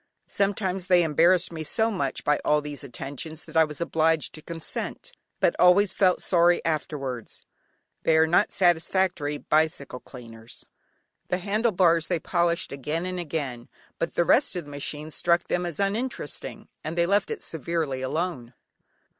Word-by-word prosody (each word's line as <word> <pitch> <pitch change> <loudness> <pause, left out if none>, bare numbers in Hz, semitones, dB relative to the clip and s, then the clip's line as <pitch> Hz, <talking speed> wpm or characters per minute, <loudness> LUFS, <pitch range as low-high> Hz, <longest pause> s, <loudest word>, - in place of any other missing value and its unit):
Sometimes 195 -2 -1
they 180 -2 +5
embarrassed 170 +4 +3
me 160 - -5
so 220 +9 +1
much 140 -10 -2
by 150 0 +2
all 150 0 +3
these 145 -1 -7
attentions 140 +4 -6
that - - -14
I 160 - +7
was 150 -1 -5
obliged 160 -2 +1
to 155 - -9
consent, 165 0 -5 0.3
but - - +2
always 185 +3 +5
felt 185 -3 +2
sorry 175 -1 +4
afterwards; 140 -6 -4 0.6
they 160 - +3
are 160 - +6
not 175 +6 +3
satisfactory 175 -3 +1
bicycle 155 -4 0
cleaners. 115 -3 -11 0.6
The 180 - 0
handle 210 +5 0
bars 170 -4 +3
they 175 -3 0
polished 170 0 0
again 150 +5 -3
and 185 0 -3
again, 140 -7 -4 0.3
but 165 - -2
the 170 - +2
rest 255 - +3
of 175 -3 -4
the 145 - -11
machine 150 +2 -5
struck 170 +2 +1
them 175 0 0
as 165 -3 -5
uninteresting, 215 +6 -3 0.2
and 160 +2 -5
they 170 - +3
left 200 +3 +2
it 450 - -5
severely 160 -4 -2
alone. 130 -3 -3
165 Hz, 160 wpm, -26 LUFS, 150-180 Hz, 0.6 s, I